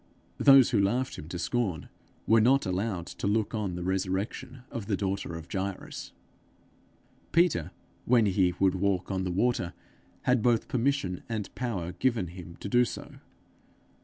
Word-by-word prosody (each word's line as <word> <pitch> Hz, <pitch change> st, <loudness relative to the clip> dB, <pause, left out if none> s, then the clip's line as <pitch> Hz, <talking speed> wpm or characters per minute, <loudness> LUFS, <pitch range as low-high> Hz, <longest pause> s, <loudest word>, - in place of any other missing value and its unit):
Those 135 Hz, -3 st, +7 dB
who 110 Hz, -, +3 dB
laughed 120 Hz, +6 st, 0 dB
him 75 Hz, -, -9 dB
to 90 Hz, -, -4 dB
scorn 95 Hz, -, -1 dB, 0.4 s
were 115 Hz, 0 st, +5 dB
not 135 Hz, +5 st, +4 dB
allowed 95 Hz, -1 st, -2 dB
to -, -, -5 dB
look 105 Hz, +1 st, +1 dB
on 105 Hz, -5 st, -2 dB
the 90 Hz, -, -4 dB
resurrection 95 Hz, +7 st, -2 dB
of 110 Hz, -4 st, -5 dB
the 100 Hz, -3 st, 0 dB
daughter 95 Hz, -3 st, -2 dB
of 80 Hz, -1 st, -8 dB
Jairus. 95 Hz, -1 st, -4 dB, 1.2 s
Peter, 170 Hz, -, +3 dB, 0.4 s
when 120 Hz, -2 st, +4 dB
he 95 Hz, -3 st, +2 dB
would 95 Hz, -2 st, +4 dB
walk 95 Hz, 0 st, 0 dB
on 95 Hz, -1 st, -1 dB
the 90 Hz, -, -1 dB
water, 95 Hz, -2 st, 0 dB, 0.5 s
had 125 Hz, -2 st, +3 dB
both 120 Hz, 0 st, +2 dB
permission 125 Hz, -8 st, 0 dB
and 110 Hz, -3 st, -4 dB
power 100 Hz, -9 st, -3 dB
given 100 Hz, 0 st, 0 dB
him 85 Hz, -1 st, -10 dB
to -, -, -4 dB
do 120 Hz, +4 st, +4 dB
so. 120 Hz, -, -6 dB
100 Hz, 160 wpm, -29 LUFS, 90-120 Hz, 1.2 s, Those